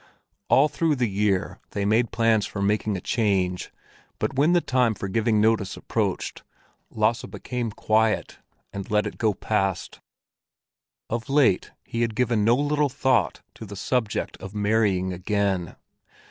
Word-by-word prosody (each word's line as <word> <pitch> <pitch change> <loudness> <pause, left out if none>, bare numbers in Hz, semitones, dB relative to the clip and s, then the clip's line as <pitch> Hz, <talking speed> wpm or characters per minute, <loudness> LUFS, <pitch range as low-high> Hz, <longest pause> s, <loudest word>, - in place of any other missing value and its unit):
All 140 +3 +6
through 155 +1 0
the 125 -3 +1
year 100 -2 0
they 100 -1 -1
made 110 +3 +2
plans 115 -2 +2
for 100 - -6
making 105 0 0
a - - -7
change, 95 -6 0 0.5
but - - -2
when 145 +6 +3
the 175 - +5
time 125 -7 +1
for 100 - -5
giving 110 +2 +1
notice 110 -2 +1
approached, - - -2 0.5
Lasse 110 +1 0
became 125 -2 -4
quiet 110 +1 0 0.3
and 100 -1 -6
let 105 0 +2
it - - -6
go 110 -3 +2
past. 95 -3 -2 1.1
Of 115 +4 -4
late 135 -9 +3
he 115 - -4
had 115 -2 0
given 120 -3 +1
no 115 +3 +5
little 145 +1 +1
thought 130 -5 +1
to - - -10
the 100 -2 -8
subject 115 +2 -2
of 95 +2 -9
marrying 100 -3 +1
again. 95 -1 -1
110 Hz, 150 wpm, -25 LUFS, 100-120 Hz, 1.1 s, All